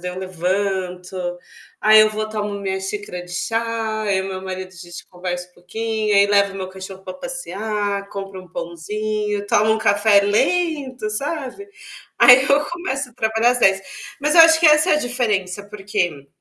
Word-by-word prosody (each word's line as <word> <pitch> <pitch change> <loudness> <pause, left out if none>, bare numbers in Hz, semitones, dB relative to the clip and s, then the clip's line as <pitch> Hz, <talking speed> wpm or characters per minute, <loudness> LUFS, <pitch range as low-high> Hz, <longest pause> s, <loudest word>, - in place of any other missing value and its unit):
daí 180 +1 -4
eu 180 - -7
levanto, 185 0 -3 0.6
aí 215 0 +7
eu 215 0 +5
vou, 215 0 -3
tomo 210 -1 -3
minha 190 -1 -2
xícara 190 -2 -5
de 180 - -12
chá, 225 +3 -2
aí 200 -3 +1
o 190 - -5
meu 190 -1 -6
marido 185 0 -6
a - - -23
gente 175 0 -10
conversa 180 0 -5
um - - -32
pouquinho, 215 +3 -2
aí 200 0 +6
levo 200 -1 +2
meu 190 -1 -5
cachorro 190 0 -10
para 185 - -7
passear, 205 -3 -4
compro 195 -2 -7
um 185 - -17
pãozinho, 210 +5 -4
tomo 210 +1 +3
um - - -2
café 205 -1 +4
lento, 260 - 0
sabe. 285 - -4 0.5
Aí 250 +2 +8
eu 280 +2 +2
começo 285 -7 -4
a - - -26
trabalhar 225 +2 +2
às 250 - -1
10, 195 0 +4 0.4
mas 300 +2 +1
eu 340 - +9
acho 325 -1 +7
que 330 - +4
essa 305 +3 +5
é - - +5
a - - +3
diferença 210 -8 -2
porque 195 -8 -3
205 Hz, 185 wpm, -20 LUFS, 190-230 Hz, 0.6 s, eu